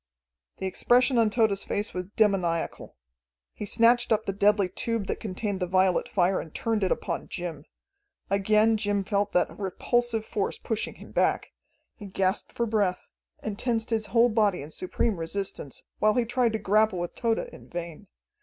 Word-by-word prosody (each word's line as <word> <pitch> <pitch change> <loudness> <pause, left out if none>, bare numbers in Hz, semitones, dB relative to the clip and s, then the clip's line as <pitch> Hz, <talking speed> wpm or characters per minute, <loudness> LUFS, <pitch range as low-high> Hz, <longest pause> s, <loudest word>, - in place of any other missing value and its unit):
The 190 - -4
expression 245 +6 +3
on 225 -2 +4
Tode's 210 -2 +1
face 205 +1 -3
was 180 0 -3
demoniacal. 185 - 0 0.6
He 210 - -6
snatched 235 +3 +3
up 220 -1 +2
the 195 - -2
deadly 205 0 +3
tube 225 +3 -2
that - - -3
contained 205 -1 -3
the 180 - -1
violet 185 0 +2
fire 185 0 +2
and 160 - -11
turned 225 +2 -1
it 185 - +1
upon - - -2
Jim. 170 -4 -6 0.6
Again 215 +3 +3
Jim 205 -2 0
felt 200 +1 0
that 180 - +1
repulsive 225 +4 0
force 205 -3 -2
pushing 225 -2 -3
him - - -13
back. - - +1 0.4
He 205 - -10
gasped 190 0 -1
for 235 - 0
breath, 205 -5 0 0.4
and 210 -2 -4
tensed 230 -2 -1
his 220 -2 0
whole 235 +2 +4
body 210 -8 +1
in 150 - -10
supreme 185 +5 -1
resistance, 165 -4 -4 0.2
while 215 0 +3
he 245 -2 +2
tried 240 -1 +1
to - - +1
grapple 215 0 +2
with 175 0 -3
Tode 230 -2 0
in - - -8
vain. 170 +2 -7
205 Hz, 175 wpm, -27 LUFS, 185-225 Hz, 0.6 s, on